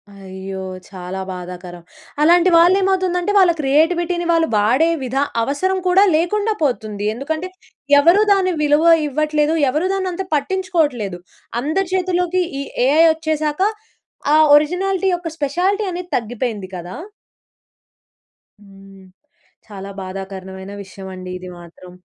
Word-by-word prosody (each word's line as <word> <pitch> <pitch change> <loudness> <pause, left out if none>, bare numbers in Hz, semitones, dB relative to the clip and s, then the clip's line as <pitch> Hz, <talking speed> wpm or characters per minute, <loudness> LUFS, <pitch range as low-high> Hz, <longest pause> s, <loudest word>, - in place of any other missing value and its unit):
అయ్యో! 190 0 -8 0.3
చాలా 185 0 -6
బాధాకరం. 180 -1 -8 0.4
అలాంటి 345 +3 +5
వాళ్ళేమవుతుందంటే, 370 +1 +2
వాళ్ళ 370 -3 +6
క్రియేటివిటీని 340 +5 +1
వాళ్ళు 330 -1 +2
వాడే 245 +11 +3
విధా 265 +2 0 0.2
అవసరం 370 +10 -1
కూడా 370 +2 +5
లేకుండా 415 +7 0
పోతుంది. 215 -7 -2
ఎందుకంటే, 315 +9 -4 0.5
ఎవరూ 340 +8 +5
దాని 380 -2 +1
విలువ 300 +2 +3 0.2
ఇవ్వట్లేదు 300 +1 0 0.2
ఎవరూ 310 +7 0
దాన్నంత 375 -1 -2
పట్టించుకోవట్లేదు. 295 - -1 0.4
అందరి 315 +8 -1
చేతుల్లోకి 365 -1 0 0.2
ఈ - - -3 0.2
ఏఐ 305 +4 +5
ఒచ్చేశాక, 310 0 -2 0.7
ఆ - - +6 0.2
ఒరిజినాలిటీ 370 +5 +1
యొక్క 350 -1 -3
స్పెషాలిటీ 355 +9 0
అనేది 355 0 -6
తగ్గిపోయింది 230 -3 -4
కదా? 175 +1 -8 1.7
హ్మ్. 195 -1 -16 0.6
చాలా 200 -2 -9
బాధాకరనమైన 190 0 -8
విషయవండి 185 -1 -9
ఇది 185 0 -9
మాత్రం. 175 +1 -14
300 Hz, 110 wpm, -19 LUFS, -, 1.7 s, వాళ్ళ